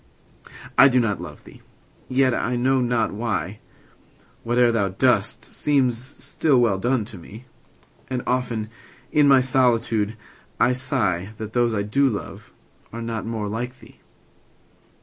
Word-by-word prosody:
I 135 - +10
do 130 -2 +3
not 115 -4 0
love - - -10
thee!—yet, 130 -1 -3
I 125 +1 -1
know 130 +2 +2
not 120 -2 0
why, 105 -3 -3 0.6
5 - - -32 0.2
Whate'er 120 0 +3
thou 100 -4 +1
dost 95 - +1
seems 130 -5 +1
still 140 0 0
well 110 -6 +2
done, 120 +1 0
to 105 -3 -11
me: 105 +8 -12 0.6
And 125 -1 -3
often 120 -4 -2 0.4
in 150 -2 +4
my 135 -2 +6
solitude 120 -4 +1 0.4
I 125 - +4
sigh 115 - -1
That 110 0 -7
those 120 -2 +2
I 100 - 0
do 135 +7 +2
love 105 - -7 0.4
are 115 +1 -6
not 115 -1 -4
more 110 -2 -3
like 120 +5 -4
thee! 115 -1 -17
120 Hz, 145 wpm, -23 LUFS, 110-130 Hz, 0.6 s, I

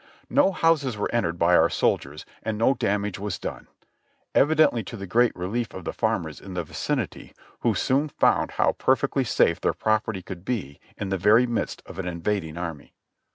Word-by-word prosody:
No 285 -8 +4
houses 160 - +1
were 105 - -2
entered 85 -8 0
by 85 +1 +4
our - - +5
soldiers 75 +2 -1 0.2
and 110 -1 -3
no 115 +5 +4
damage 105 -4 -1
was 105 -1 -3
done, - - -6 0.7
evidently 145 -4 +4
to 115 - -7
the 100 - -6
great 120 +5 +3
relief 105 +6 -3
of 95 - -7
the - - -3
farmers 80 -3 -2
in 95 -2 -9
the 85 - -1
vicinity, 80 - -4 0.2
who - - +1
soon 140 +4 +1
found - - +2
how - - +3
perfectly - - +1
safe - - +2
their - - +1
property 110 -3 0
could 90 -1 -8
be 95 - -4 0.2
in 100 - -4
the 95 -1 -1
very 105 +6 +5
midst 120 -2 -3
of - - -10
an 95 - -3
invading 85 -1 -2
army. 85 -4 -6
105 Hz, 185 wpm, -25 LUFS, 90-120 Hz, 0.7 s, our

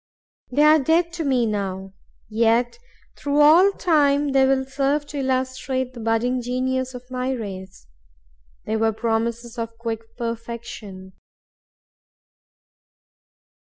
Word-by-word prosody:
They 290 +4 +3
are 305 +1 +7
dead 330 +4 +2
to 335 -1 -3
me 260 -5 +2
now; 195 -3 -3 0.3
yet 230 - +1 0.4
through 285 0 -1
all 335 +7 +7
time 290 -6 +2
they 270 -1 +4
will 265 0 +2
serve 275 +2 0
to 290 - -5
illustrate 260 -1 -2
the 240 - -10
budding 230 +3 0
genius 255 +1 -2
of 250 - -8
my 255 0 -2
race. 190 -6 -7 0.8
They 220 +1 -1
were 225 0 +1
promises 235 +1 -2
of 230 0 -5
quick 225 -1 -6
perfection. 230 -5 -6
250 Hz, 115 wpm, -22 LUFS, 225-275 Hz, 0.8 s, are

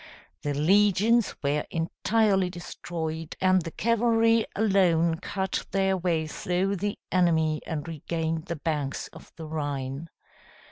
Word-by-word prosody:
The 145 -1 -2
legions 205 +7 +3
were 145 +1 +1
entirely 190 +3 +1
destroyed, 165 -2 -5
and 185 0 +4
the 165 - -5
cavalry 230 +2 +2
alone 175 -6 +3
cut 190 -1 -2
their 195 -1 +1
way 170 -3 0
through 180 +5 -1
the 205 +3 -2
enemy 160 -4 +2
and 155 -2 -4
regained 160 0 -3
the 170 - -2
banks 150 -3 -3
of - - -15
the 160 - -8
Rhine. 145 -1 -4
170 Hz, 125 wpm, -27 LUFS, 160-195 Hz, -, and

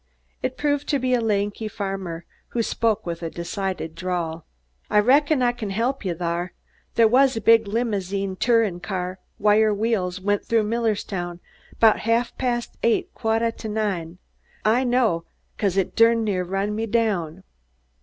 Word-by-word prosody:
It 255 - -3
proved 290 -1 0
to 285 - +3
be 255 -1 0
a 245 - +3
lanky 210 0 -1
farmer, 195 -5 -5 0.2
who 235 - -1
spoke 220 -1 0
with 170 -1 -4
a 165 - -3
decided 175 -1 -4
drawl. 170 -3 -3 0.4
"I 210 - +2
reckon 280 +5 +4
I 240 - +4
kin 240 -4 -6
help 235 +7 -1
ye 185 - -1
thar. 170 +1 -3 0.4
They 230 - +6
was 260 +2 +4
a - - +1
big 225 +1 +5
limozine 200 -3 -1
tourin' 225 -7 +2
car 185 -1 -4 0.2
with - - -19
wire 215 +1 +5
wheels 205 -4 -1
went 205 +1 0
through 230 -1 +2
Millerstown 205 -6 -2 0.4
'bout 220 -2 +5
ha'f 230 +2 0
past 240 -2 -2
eight, 230 - +1
quat' 225 0 0
t' - - -5
nine. 195 -6 -2 0.5
I 230 +4 +3
know, 240 -9 +1 0.3
'cause 195 -3 0
it 195 - 0
durn 230 0 +5
near 195 -4 0
run 195 +3 -2
me 225 +1 -2
down." 195 -7 0
210 Hz, 165 wpm, -23 LUFS, 185-230 Hz, 0.5 s, They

